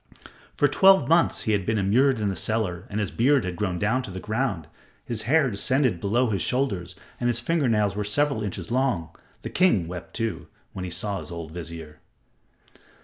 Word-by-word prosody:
For 145 - +2
twelve 190 +6 +5
months 165 +1 +3
he 110 - 0
had 100 -2 +1
been 110 +4 0
immured 120 +6 +3
in 105 -1 0
the 95 - -2
cellar 100 -6 -2
and 105 - -3
his 105 -3 -2
beard 135 +1 +3
had 90 -1 -3
grown 90 -1 -2
down 110 +7 +1
to 125 - -7
the 95 0 -6
ground, 110 - -2 0.4
his 115 -2 -3
hair 145 -4 +4
descended 125 - 0
below 115 +4 +1
his 100 -4 -1
shoulders 100 -9 -1 0.2
and 120 - 0
his 120 -1 +1
finger 145 +1 0
nails 105 -3 +1
were 105 - -1
several 140 +3 0
inches 95 -2 -5
long. 120 -11 0 0.3
The - - -5
king 115 - +3
wept, 90 0 -8
too, 115 -1 -3 0.3
when 90 - -5
he - - -5
saw 100 +3 -2
his - - -9
old 85 -2 -7
vizier. 80 -2 -8
105 Hz, 200 wpm, -25 LUFS, 90-130 Hz, 0.4 s, twelve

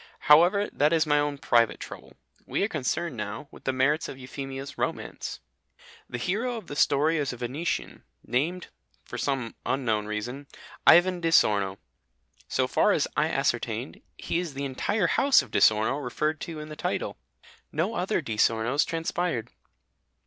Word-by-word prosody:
However, 175 +7 +5
that 150 +1 +3
is 165 -1 +3
my 150 -1 +3
own 145 -1 -1
private 120 -4 +2
trouble. - - -10 0.3
We - - 0
are - - +2
concerned 160 - -2
now 105 +5 -5
with - - -15
the 135 - +2
merits 140 +5 +1
of - - -8
Euphemia's 135 +1 -7
romance. - - -4 0.7
The 120 - -4
hero 225 - -1
of 220 - -8
the 145 - -7
story 150 +3 +3
is 145 -3 -1
a 125 - -7
Venetian, 130 +8 -3 0.2
named 160 +9 -1 0.4
(for - - -7
some 135 -5 -1
unknown 115 -6 0
reason) 120 +7 -5 0.4
Ivan 175 0 +6
di 165 - +1
Sorno. 100 - +3 0.7
So - - +1
far - - +3
as - - +1
I - - +2
ascertained, - - -2 0.2
he 170 - -2
is 170 -6 -5
the 140 +1 -3
entire 180 +10 0
house 270 - +4
of 120 - -14
Di - - +2
Sorno 110 +6 +4
referred 150 +5 -1
to 165 -2 -6
in 150 0 -8
the 155 - -7
title. - - -2 0.6
No 170 +9 -1
other 185 -1 0
Di 110 -7 -5
Sornos 115 +6 +2
transpired. 165 -7 -2
145 Hz, 165 wpm, -27 LUFS, 125-170 Hz, 0.7 s, Ivan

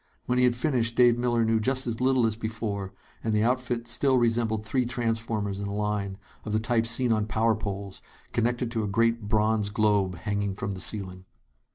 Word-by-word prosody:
When 125 0 +1
he 125 - +5
had 120 -1 +2
finished, 120 -3 0
Dave 120 -1 +5
Miller 120 -1 +1
knew 110 0 +2
just 130 +4 0
as 115 0 -3
little 130 -2 +3
as 110 -1 0
before, 110 -3 -4 0.3
and 110 -1 0
the 105 - +2
outfit 125 -1 0
still 130 +3 +2
resembled 115 -2 +1
three 125 +4 +1
transformers 115 -4 -2
in 100 - -3
a 100 - -4
line, 105 -2 -2 0.3
of 105 - -4
the 110 - +2
type 115 0 0
seen 120 +1 +2
on 110 -1 +1
power 110 +1 +2
poles, 100 -2 -5 0.3
connected 120 +1 0
to 115 -2 -1
a - - -2
great 115 +1 +1
bronze 105 -1 +2
globe 100 -3 +1
hanging 100 +2 -2
from 100 0 -4
the 95 - -6
ceiling. 95 -3 -3
110 Hz, 200 wpm, -27 LUFS, 105-120 Hz, 0.3 s, he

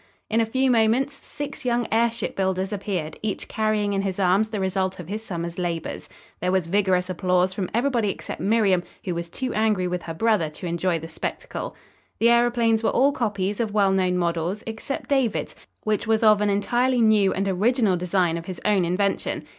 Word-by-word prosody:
In 225 +1 +3
a 225 - 0
few 260 +3 +2
moments 235 +4 +2
six 290 0 -8
young 240 -2 0
airship 230 +1 0
builders 190 +1 -1
appeared, 185 -6 -3
each 210 -3 -3
carrying 215 -1 0
in 195 - +1
his 195 -1 -3
arms 195 +3 +3
the 215 -2 -3
result 190 0 -1
of 175 - -8
his 210 +4 -4
summer's 170 -4 -5
labors. 170 -2 -4 0.3
There 180 - 0
was 190 -3 +1
vigorous 185 0 +1
applause 185 0 +1
from 185 -2 -3
everybody 235 -3 +1
except - - -6
Miriam, 200 -4 +3 0.2
who 180 - -1
was 170 0 -4
too 255 +7 -4
angry 210 -4 +1
with 180 0 -2
her 165 -1 -6
brother 210 -5 +2
to 155 +4 -9
enjoy 170 0 0
the 165 0 -7
spectacle. 160 - -5 0.4
The 235 +1 +4
aeroplanes 235 -2 +3
were 225 - +2
all 275 +3 +3
copies 205 -6 -2
of 220 -3 -2
well 200 -2 +4
known 185 -1 +1
models, 170 +3 -1
except 225 +5 -5
David's, 265 -6 0 0.3
which 215 0 -1
was 225 0 +2
of 215 -1 +6
an 210 - +2
entirely 240 +5 +1
new 215 -3 +4
and 195 +1 -1
original 210 +2 +2
design 175 -1 0
of 165 - -11
his 185 -3 -6
own 200 -4 +3
invention. 195 +3 -1
200 Hz, 195 wpm, -24 LUFS, 180-225 Hz, 0.4 s, of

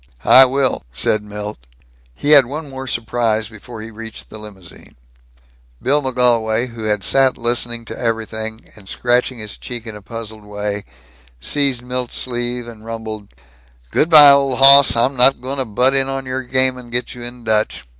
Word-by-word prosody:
"I 130 - +8
will," 130 -6 -1
said 105 - 0
Milt. 105 - -8 0.6
He 145 - -2
had 140 -5 +7
one 150 +3 -7
more 130 0 -8
surprise 115 -2 -2
before 110 +1 -11
he 115 - -10
reached 110 0 -10
the 110 - -10
limousine. 100 -5 -13 0.8
Bill 145 +2 0
McGolwey, 120 -3 +1
who 115 -2 -9
had 105 -2 -1
sat 135 +5 +3
listening 120 -1 -2
to - - -8
everything 110 -1 -4
and 100 -3 -15
scratching 125 +1 -1
his 105 -2 -8
cheek 120 -2 -8
in 110 -2 -8
a 105 - -11
puzzled 110 0 -8
way, 105 -1 -5 0.5
seized 135 - -1
Milt's 125 0 -4
sleeve 120 -1 -3
and 110 -2 -12
rumbled: 110 -2 -7 0.6
"Good 160 - +1
by, 150 -3 +10
old 140 -2 +2
hoss. 140 -1 +7
I'm 125 +4 +1
not 130 +1 +5
going 135 +3 -5
to 130 - 0
butt 125 +5 +2
in 135 0 +3
on 135 0 -4
your 130 +1 -4
game 130 0 +1
and 120 -1 -13
get 125 +1 -1
you 125 - -12
in 120 0 -8
Dutch. 110 -1 0
120 Hz, 175 wpm, -17 LUFS, 110-130 Hz, 0.8 s, by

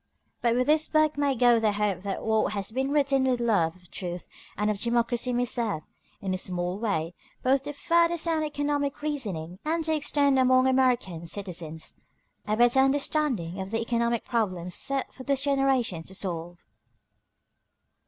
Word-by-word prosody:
But 235 -1 +2
with 250 +1 +2
this 310 +2 +3
book 310 -1 +2
may 285 -2 +1
go 240 -1 +5
the 215 -2 +1
hope 205 -3 0
that 195 +1 -4
what 220 -1 +1
has 200 0 -3
been 265 +3 -1
written 275 -2 +2
with 255 -2 +1
love 200 -9 +1
of 180 -2 -21
truth 175 -1 -5 0.3
and 210 +2 +1
of 205 - -4
democracy 240 +1 +1
may 245 0 +1
serve, 225 -9 -1 0.4
in 190 -1 -1
its 185 - -2
small 180 +1 -2
way, 175 -7 -1 0.3
both 265 +1 +3
to 290 - -4
further 335 +3 +2
sound 325 -1 +1
economic 290 -1 -2
reasoning 195 - -3
and 325 +2 -1
to 315 0 +1
extend 285 -2 +2
among 255 0 +4
American 250 -10 +1
citizens 165 -4 -4 0.5
a 215 0 0
better 240 +2 +5
understanding 270 - +1
of 190 - -5
the 225 +2 -1
economic 235 0 0
problems 185 -7 -1
set 275 +6 -1
for - - -11
this 275 0 0
generation 270 - +1
to 190 - -7
solve. 175 -2 -3
240 Hz, 170 wpm, -27 LUFS, 190-275 Hz, 0.5 s, go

